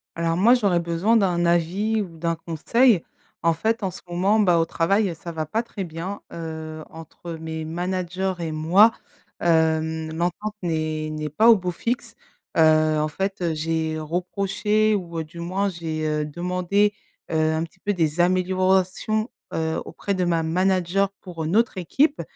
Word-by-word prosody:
Alors 165 Hz, 0 st, 0 dB
moi, 225 Hz, +7 st, +6 dB
j'aurais 200 Hz, -8 st, +3 dB
besoin 170 Hz, +7 st, +2 dB
d'un 180 Hz, -5 st, +2 dB
avis, 185 Hz, +6 st, +1 dB
ou 170 Hz, -4 st, -11 dB
d'un 165 Hz, 0 st, 0 dB
conseil. 175 Hz, -, +2 dB, 0.4 s
En 165 Hz, 0 st, +3 dB
fait, 225 Hz, +8 st, -1 dB
en 195 Hz, -, 0 dB
ce 180 Hz, -, -10 dB
moment, 190 Hz, +5 st, +2 dB
bah, 180 Hz, -5 st, +4 dB
au 165 Hz, -, +2 dB
travail, 185 Hz, +3 st, +1 dB
ça 170 Hz, +1 st, -8 dB
va 160 Hz, -2 st, -4 dB
pas 225 Hz, +8 st, -1 dB
très 215 Hz, -4 st, -6 dB
bien, 175 Hz, +5 st, -6 dB
heu, 160 Hz, -1 st, -6 dB
entre 165 Hz, +1 st, -9 dB
mes 160 Hz, 0 st, -5 dB
managers 180 Hz, +2 st, -2 dB
et 165 Hz, -2 st, -3 dB
moi. 175 Hz, +8 st, +5 dB, 0.5 s
Hem, 160 Hz, -1 st, +1 dB
l'entente 180 Hz, +5 st, -2 dB
n'est 155 Hz, -2 st, -2 dB
n'est 155 Hz, 0 st, -4 dB
pas 220 Hz, +11 st, +4 dB
au 230 Hz, -, +9 dB
beau 180 Hz, -1 st, -3 dB
fixe. 240 Hz, +9 st, -3 dB, 0.4 s
Heu, -, -, +4 dB, 0.4 s
en 155 Hz, -, +1 dB
fait, 190 Hz, +5 st, -3 dB
heu, 170 Hz, -2 st, 0 dB
j'ai 160 Hz, 0 st, -1 dB
reproché 195 Hz, +6 st, 0 dB
ou, 175 Hz, -5 st, -3 dB
heu, -, -, -2 dB
du 165 Hz, +2 st, -12 dB
moins, 190 Hz, +4 st, -1 dB
j'ai, 160 Hz, -3 st, -4 dB
heu, 150 Hz, 0 st, 0 dB
demandé, 180 Hz, +6 st, 0 dB, 0.4 s
heu, 155 Hz, 0 st, +2 dB
un 160 Hz, +1 st, 0 dB
petit 170 Hz, +2 st, -11 dB
peu 205 Hz, +2 st, -1 dB
des 165 Hz, -1 st, +1 dB
améliorations, 185 Hz, +4 st, +1 dB, 0.2 s
heu, 160 Hz, 0 st, -1 dB
auprès 200 Hz, -, -4 dB
de 185 Hz, -, 0 dB
ma 170 Hz, -2 st, +1 dB
manager 185 Hz, +3 st, +1 dB
pour 170 Hz, -4 st, -6 dB
une 165 Hz, +5 st, -1 dB
autre 230 Hz, -4 st, +2 dB
équipe 285 Hz, -, +1 dB
175 Hz, 170 wpm, -23 LUFS, 160-195 Hz, 0.5 s, au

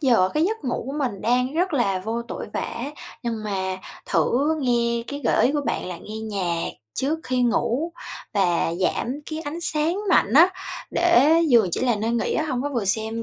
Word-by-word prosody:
giờ 235 Hz, -, +4 dB
cái 305 Hz, +2 st, +3 dB
giấc 440 Hz, -1 st, -2 dB
ngủ 250 Hz, -, -1 dB
của 270 Hz, -, -4 dB
mình 240 Hz, -9 st, -2 dB
đang 250 Hz, +3 st, +1 dB
rất 355 Hz, +2 st, +1 dB
là 215 Hz, -9 st, +1 dB
vô 225 Hz, +5 st, -3 dB
tội 235 Hz, -, -6 dB
vạ -, -, -1 dB
á, 245 Hz, +5 st, -4 dB, 0.3 s
nhưng 230 Hz, -3 st, -3 dB
mà 190 Hz, -2 st, -2 dB, 0.3 s
thử 290 Hz, +6 st, +2 dB
nghe 235 Hz, -2 st, +1 dB
cái 285 Hz, 0 st, -5 dB
gợi -, -, +4 dB
ý 265 Hz, -, +1 dB
của 295 Hz, -, +1 dB
bạn -, -, -1 dB
là 180 Hz, -1 st, -5 dB
nghe 215 Hz, -, -8 dB
nhạc 190 Hz, -6 st, -2 dB, 0.2 s
trước 300 Hz, +4 st, 0 dB
khi 255 Hz, -3 st, 0 dB
ngủ 245 Hz, +6 st, +1 dB, 0.4 s
và 175 Hz, -4 st, +2 dB
giảm 250 Hz, +8 st, -1 dB
cái 310 Hz, 0 st, -3 dB
ánh 320 Hz, +2 st, -5 dB
sáng 320 Hz, 0 st, 0 dB
mạnh -, -, +4 dB
á, 335 Hz, +6 st, +8 dB, 0.4 s
để 325 Hz, -3 st, +5 dB
giường 230 Hz, -8 st, +5 dB
chỉ -, -, -1 dB
là 245 Hz, -3 st, +2 dB
nơi 220 Hz, +2 st, -1 dB
nghỉ 235 Hz, -1 st, 0 dB
á, 315 Hz, -, +1 dB
hông 255 Hz, -2 st, -1 dB
có 290 Hz, -, -1 dB
vừa 240 Hz, -7 st, -2 dB
xem 220 Hz, +3 st, -1 dB
245 Hz, 210 wpm, -24 LUFS, 220-290 Hz, 0.4 s, á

